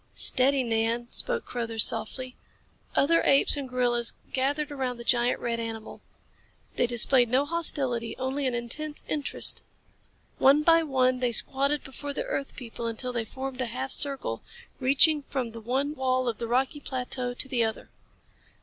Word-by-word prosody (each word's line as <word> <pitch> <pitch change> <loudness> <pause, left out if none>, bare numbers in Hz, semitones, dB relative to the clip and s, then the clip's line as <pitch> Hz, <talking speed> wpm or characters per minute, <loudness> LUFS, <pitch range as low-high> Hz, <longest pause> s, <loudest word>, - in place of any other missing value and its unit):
"Steady, 265 +1 +4
Nan," 230 +1 -1
spoke 485 -2 -3
Carruthers 230 -2 0
softly. 250 +3 -2 0.6
Other 330 +4 +3
apes 275 +2 +7
and 280 -3 -5
gorillas 240 -2 0 0.2
gathered 285 +3 -1
around 260 -3 -3
the 235 - -8
giant 240 +1 +1
red 235 -1 -2
animal. 225 -1 -7 0.7
They 245 - +1
displayed 240 +1 +4
no 260 +4 +2
hostility, 275 -8 0
only 265 +1 -2
an 250 - -1
intense 295 +6 -4
interest. 295 -2 +1 0.8
One 285 +3 +5
by 330 +1 +5
one 255 -4 +1
they 250 -1 0
squatted 275 +5 +1
before 285 +2 -7
the - - -4
earth 275 - -4
people 235 -2 -7
until 245 +2 -4
they 235 -2 -2
formed 265 +2 -6
a 250 - -1
half 260 +3 -4
circle, 270 - -1 0.4
reaching 290 +3 +3
from 260 -4 -4
the 230 0 -10
one 265 +6 -1
wall 255 -2 -1
of 230 -3 -3
the 235 - -3
rocky 260 +5 0
plateau 250 -2 -3
to 265 - -4
the 250 -3 0
other. 220 -1 -4
255 Hz, 160 wpm, -27 LUFS, 235-275 Hz, 0.8 s, apes